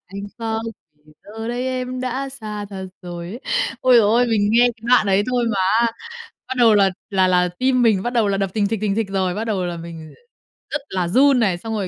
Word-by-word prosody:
"Anh 195 +2 -8 0.2
khóc, 225 -1 -2 0.4
vì 155 - -20
giờ 225 +2 -7
đấy 245 +2 -2
em 255 0 -3
đã 255 +2 -3
xa 215 -5 -6
thật 190 -1 -6 0.2
rồi." 175 -1 -7
ấy. 235 +7 -8 0.4
Ôi 255 -1 +4
giời 230 - +6
ơi, 240 +3 +3
mình 210 -3 +1
nghe 235 - +5 0.2
cái 225 - -28
đoạn 250 -4 +5
ấy 195 +1 +3
thôi 245 -1 +1
mà 210 - -2 0.2
á, 235 - +3 0.6
bắt 260 - -3
đầu 225 -3 +6
là 195 -2 +4 0.2
là 190 -1 +3
là 180 0 +3
tim 255 -1 +2
mình 215 -5 +3
bắt 240 - -3
đầu 230 -4 +2
là 195 - +1
đập 195 -1 -1
thình 210 -2 +1
thịch, 220 -1 -2
thình 200 -2 0
thịch 220 -2 -1
rồi, 190 -2 -1
bắt 220 +3 -3
đầu 200 -5 -1
là 175 -1 -4
mình 165 -2 -10 0.6
r - - -12
rất 295 - -1
là 185 -2 -1
run 265 +7 +4
này. 195 -6 +1
Xong 225 +5 -6
rồi, 200 -3 -2
215 Hz, 250 wpm, -20 LUFS, 190-240 Hz, 0.6 s, giời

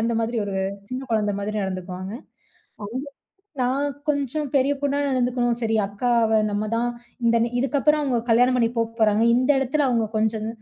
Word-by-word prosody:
அந்த 230 +1 0
மாதிரி 230 +1 -2
ஒரு 200 -1 -4 0.3
சின்ன 255 +1 -4
குழந்தை 210 -2 +1
மாதிரி 215 +1 -3
நடந்துக்குவாங்க. 185 +1 -5 0.7
அவுங்க 250 +7 -5 0.6
நான் 270 +3 +1 0.2
கொஞ்சம் 285 +1 -1
பெரிய 275 +2 +3
பொண்ணா 285 0 0
நடந்துக்கணும். 245 -2 0
சரி, 225 -1 +1
அக்காவ 230 +2 +1 0.2
நம்ம 210 +1 -1
தான் 240 +1 0 0.4
இந்த 235 0 +4
நி 235 - -1
இதுக்கப்பறம் 290 +3 +2
அவுங்க 250 -4 +1
கல்யாணம் 250 +2 +4
பண்ணி 230 -1 +3
போ - - +3 0.2
போறாங்க. 215 0 +3
இந்த 255 +3 +1
இடத்தில 270 +2 +1
அவுங்க 230 -3 +1
கொஞ்சம் 220 0 0
235 Hz, 165 wpm, -23 LUFS, 220-260 Hz, 0.7 s, இந்த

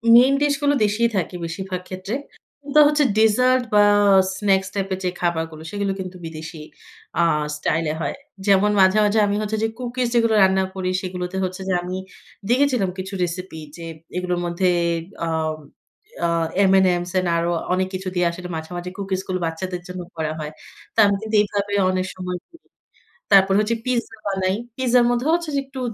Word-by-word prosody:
Main 255 +3 +7
dish 290 0 +3
গুলো 285 0 +3
দেশিই 210 +3 +2
থাকে 180 0 -2
বেশিরভাগ 185 +2 -5
ক্ষেত্রে। 190 +4 -5 0.5
কিন্তু 285 +1 +2
হচ্ছে 295 0 +3
ডেজার্ট 250 +4 +4
বা 210 0 +6 0.5
স্নাকস 195 -2 +1
টাইপের 195 -2 -2
যে 180 - +1
খাবারগুলো 160 -2 -2
সেগুলো 200 -1 -1
কিন্তু 185 -1 -6
বিদেশী 160 0 -8 0.6
আ - - +5 0.3
স্টাইল 165 +2 0
এ - - -2
হয়। 140 - -2 0.3
যেমন 200 +1 +4
মাঝে, 190 +2 +5
মাঝে 210 +1 +2
আমি 200 - 0
হচ্ছে 215 +1 -2
যে - - +3
কুকিস 250 0 -2
যেগুলো 230 -1 +3
রান্না 190 0 +3
করি 185 -1 -2
সেগুলোতে 180 -1 -4
হচ্ছে 185 +1 -4
যে - - +2
আমি 180 +1 -5 0.5
দেখেছিলাম 250 -6 +2
কিছু 190 +1 -6
রেসিপি 180 -1 -5 0.2
যে 170 - -8 0.3
এগুলোর 180 -1 -1
মধ্যে 175 +2 +1 0.6
আম 160 -1 -1 0.7
আ - - +3 0.4
M&M's 180 -2 +3 0.2
আরো 170 +1 0 0.2
অনেক 185 0 +1
কিছু 190 0 -4
দিয়ে 175 0 +2
আসলে 180 +1 -8
মাঝে, 160 0 -6
মাঝে 175 +1 -5
কুকিস 195 -2 -2
গুলো 185 -1 -2
বাচ্চাদের 175 +2 -4
জন্য 180 0 -6 0.2
করা 155 -1 -1
হয়। 150 -1 -5 0.4
তো - - -33
আমি 200 0 +3
কিন্তু 220 0 -3
এভাবে 205 0 -3 0.2
অনেক 185 0 0
সময় 180 -1 -4
করি, 335 -1 -20 0.7
তারপর 195 -1 +6
হচ্ছে 215 +2 +1
পিজ্জা 245 -3 -2
বানাই, 190 -1 0 0.2
পিজ্জার 250 -2 +3
মধ্যেও 245 +5 0
হচ্ছে 340 -2 -3
যে - - +2
একটু 270 0 -9
190 Hz, 170 wpm, -22 LUFS, 180-220 Hz, 0.7 s, Main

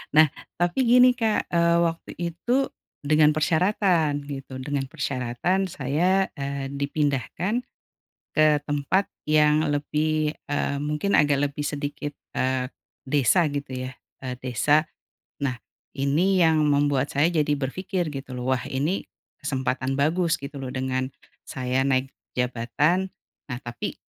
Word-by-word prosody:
Nah 155 0 +8 0.3
tapi 175 +7 +1
gini 250 +1 +7
Kak. 220 -3 +2
Eee, 170 0 +3
waktu 165 -1 -2
itu 175 +7 -4 0.5
dengan 150 +1 +5
persyaratan 160 -3 +2
gitu 135 -2 -7
dengan 135 +1 -2
persyaratan 140 +11 -1
saya, 175 +7 +1
eee, 140 0 -3
dipindahkan 145 - -1 0.7
ke 155 -1 +4
tempat 145 +7 +1 0.2
yang 150 0 +4
lebih, 150 +1 0 0.2
eee, 140 -1 0
mungkin 150 +7 -1
agak 145 -2 +4
lebih 145 - -6
sedikit, 145 0 -4 0.2
eee, 130 0 0 0.3
desa 145 +5 +3
gitu 130 -3 -4
ya. - - -9 0.3
Eee, 125 -1 -3
desa. 145 +5 +2 0.6
Nah 130 -3 0 0.4
ini 160 +8 +2
yang 160 -2 +4
membuat 145 -1 +2
saya 145 +4 +3
jadi 150 -3 +1
berpikir 170 +5 -2
gitu 135 -2 -7
loh, 125 +1 -2
wah 130 -1 0
ini 150 +8 -1 0.3
kesempatan 130 0 -1
bagus 165 +5 +2
gitu 140 +1 -7
loh 130 -2 -5
dengan 130 0 -1 0.4
saya 130 0 -1
naik 130 -1 +1 0.3
jabatan. 125 +9 +1 0.4
Nah 120 -4 -4
tapi, 120 -1 -5
145 Hz, 125 wpm, -25 LUFS, 135-165 Hz, 0.7 s, Nah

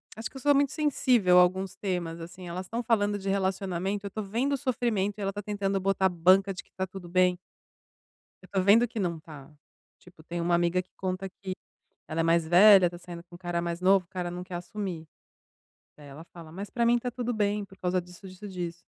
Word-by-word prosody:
acho 220 0 -5
que - - -11
eu - - -9
sou 290 +1 +4
muito 280 -1 +2
sensível 255 - +3
a - - +9
alguns 185 +1 +1
temas, 175 -4 -3
assim, 175 +2 -9
elas 180 +2 -5
estão 230 +5 -3
falando 205 -3 +1
de 195 0 -4
relacionamento, 195 0 -1
eu - - -3
tô 215 - -4
vendo 235 +8 -1
o - - +1
sofrimento 230 -7 -1
e - - -5
ela 195 - -1
tá 205 - -5
tentando 200 -1 -1
botar 190 0 +2
banca 185 +3 +4
de 185 - -8
que - - -33
tá 190 0 -2
tudo 185 -1 -10
bem. 180 0 +3 1.1
Eu - - -14
estou 195 -2 -1
vendo 215 +5 +6
que 230 - -6
não 175 -3 -1
está. 155 -2 -12 0.5
Tipo, 180 -3 -18
tem 170 +2 -5
uma 170 +1 +1
amiga 175 +1 +2
que 185 - -34
conta 190 +1 -3
que 190 0 -7 0.6
ela 160 +1 -2
é - - +3
mais 165 0 +2
velha, 185 +2 +7
tá 175 0 -10
saindo 175 -1 -9
com 175 0 -17
um - - -10
cara 175 -1 -2
mais 170 0 -3
novo, 185 -1 +4
o - - -56
cara 180 -1 -4
não 180 +1 -6
quer 180 - -9
assumir. 175 -2 -5 0.9
Daí 145 -1 -13
ela 145 +4 -11
fala: 165 -2 -11
"Mas 200 +4 -6
pra 235 -1 0
mim 240 +1 +4
tá 245 +1 -4
tudo 245 0 -3
bem, 210 -1 0
por 195 0 -17
causa 180 0 0
disso, 180 +2 -13
disso, 185 +3 -10
disso". 175 -2 -6
185 Hz, 235 wpm, -28 LUFS, 175-205 Hz, 1.1 s, a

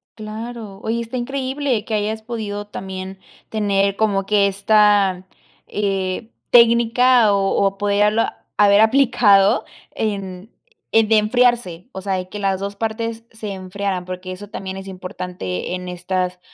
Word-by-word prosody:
Claro. 220 -1 -7
Oye, 230 +1 -1
está 235 +2 -5
increíble 265 -2 -2
que 225 - -5
hayas 215 +1 -2
podido 210 -3 -5
también 190 -1 -7 0.3
tener 200 -2 +1
como 200 -3 +1
que 200 0 +3
esta, 200 -2 +3 0.4
eh, 195 +1 -2 0.2
técnica 235 -1 +5
o 195 0 +2
o 195 0 0
poderla 205 +2 +1
haber 205 0 +6
aplicado 220 -5 +4 0.3
en 195 -1 -4 0.4
eh, 225 - +5
de 220 - +4
enfriarse, 230 -4 +1
o 190 - -7
sea, 195 0 -2
de 185 -1 -3
que 210 - -7
las 195 -2 0
2 200 +1 -4
partes 225 +1 -3
se 220 -2 -6
enfriaran, 190 0 -4
porque 185 0 -6
eso 205 +2 -9
también 190 -3 -6
es 195 0 -8
importante 180 - -5
en 180 0 -5
estas, 180 0 -2
205 Hz, 140 wpm, -20 LUFS, 190-225 Hz, 0.4 s, haber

